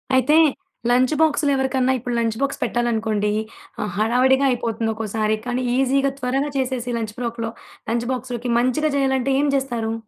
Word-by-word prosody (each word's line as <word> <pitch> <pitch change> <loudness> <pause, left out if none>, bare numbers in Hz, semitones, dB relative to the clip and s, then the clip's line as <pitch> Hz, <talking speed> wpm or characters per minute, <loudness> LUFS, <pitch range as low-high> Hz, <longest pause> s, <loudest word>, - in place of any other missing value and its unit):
అయితే 260 +4 +4 0.5
లంచ్ 255 +4 +3
బాక్స్‌లో 300 -2 +3
ఎవరికన్నా 265 -1 +1
ఇప్పుడు 245 0 -3
లంచ్ 225 -1 -1
బాక్స్ 275 0 -1
పెట్టాలనుకోండి 220 -3 0 0.5
ఆహ్, 210 - -3
హడావిడిగా 255 +5 +3
అయిపోతుంది. 230 -2 -1
ఒక్కోసారి 215 0 -1
కానీ 250 +1 -1
ఈజీగా 270 +1 +2
త్వరగా 270 +3 -1
చేసేసి 250 -2 -2
లంచ్ 220 -2 -4
ప్రోక్‌లో 230 -2 -3 0.4
లంచ్ 235 +1 -1
బాక్స్‌లోకి 245 -1 -4
మంచిగా 255 +5 +1
చేయాలంటే 265 -1 +1
ఏం 290 - +1
జేస్తారు? 240 -5 -1
245 Hz, 145 wpm, -22 LUFS, 225-265 Hz, 0.5 s, అయితే